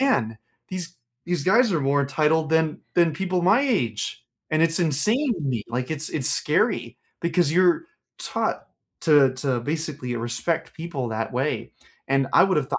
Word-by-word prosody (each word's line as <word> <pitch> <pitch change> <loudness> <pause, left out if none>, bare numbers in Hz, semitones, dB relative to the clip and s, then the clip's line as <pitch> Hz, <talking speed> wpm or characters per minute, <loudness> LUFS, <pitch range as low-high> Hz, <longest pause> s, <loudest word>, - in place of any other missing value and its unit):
man, 115 - +1 0.3
these 175 -2 -6 0.3
these 175 -5 -1
guys 225 +3 +4
are 165 - +1
more 140 +1 +2
entitled 155 +3 +1
than 160 -1 +1
than 170 -2 +4
people 180 +1 -1
my 200 +8 +5
age, 125 - -1 0.3
and 155 +1 +2
it's 165 +2 +2
insane 210 - +2
to 170 - -8
me. 125 -6 -1
Like, 125 +4 -3
it's 155 0 -3
it's 135 -5 -1
scary - - 0 0.2
because 170 -2 +1
you're 180 - +3 0.3
taught - - -2 0.4
to 145 -5 +5
to 130 -2 -1
basically 150 -3 -3
respect 120 +8 -2
people 160 -7 -4
that 110 +1 -3
way. 135 +4 -2 0.4
And 135 0 +2
I - - +7
would 190 -3 +1
have 135 - -2
thought - - -1
155 Hz, 170 wpm, -24 LUFS, 135-175 Hz, 0.4 s, I